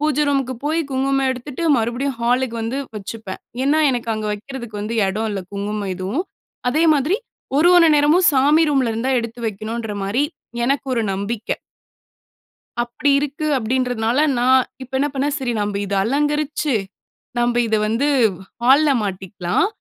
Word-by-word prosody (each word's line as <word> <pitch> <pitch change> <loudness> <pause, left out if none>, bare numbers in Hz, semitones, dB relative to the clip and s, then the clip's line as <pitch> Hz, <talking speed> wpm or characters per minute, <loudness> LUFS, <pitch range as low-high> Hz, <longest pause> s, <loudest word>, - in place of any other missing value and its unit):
பூஜை 300 -1 +1
ரூமுக்கு 270 -2 0
போய் 315 +3 +1
குங்குமம் 270 0 +1
எடுத்துட்டு, 260 +5 -5 0.2
மறுபடியும் 240 +3 -1
ஹாலுக்கு 245 0 +1
வந்து 240 +5 -2 0.2
வச்சுப்பேன். 205 -1 -7 0.2
ஏன்னா, 300 +3 +3
எனக்கு 240 -2 -2
அங்க 215 0 -3
வைக்கிறதுக்கு 220 -1 -7
வந்து 225 +2 -3
எடோ 215 +4 -2
இல்ல 195 -2 -3
குங்குமம் 200 -1 -3
எதுவும். 210 - -2 0.4
அதேமாதிரி 310 - +3 0.4
ஒரு 340 +4 +5
ஒரு 335 -2 +7
நேரமும் 305 +5 +4
சாமி 290 +4 +4
ரூம்ல 265 -5 +2
இருந்துதான் 250 +3 +1
எடுத்து 230 +1 -7
வைக்கணுன்றமாரி, 215 +2 -2 0.4
எனக்கு 275 +2 0
ஒரு 230 -2 +1
நம்பிக்க. 205 +3 -4 1.3
அப்படி 245 +4 -1
இருக்கு, 295 +2 -3
அப்படின்றதனால 245 0 0 0.2
நான் 255 +1 +4 0.2
இப்ப 260 +1 -11
என்ன 290 - +1
பண்ணேன், 280 +2 0
"சரி 255 -3 -2
நம்ப 205 -1 -1
இத 200 - -3
அலங்கரிச்சு, 295 +2 0 0.6
நம்ப 240 0 +1
இத 220 - +2
வந்து 230 +7 +1 0.6
ஹால்‌ல 280 +4 +5
மாட்டிக்கலாம். 190 - -1
250 Hz, 140 wpm, -20 LUFS, 220-285 Hz, 1.3 s, ஒரு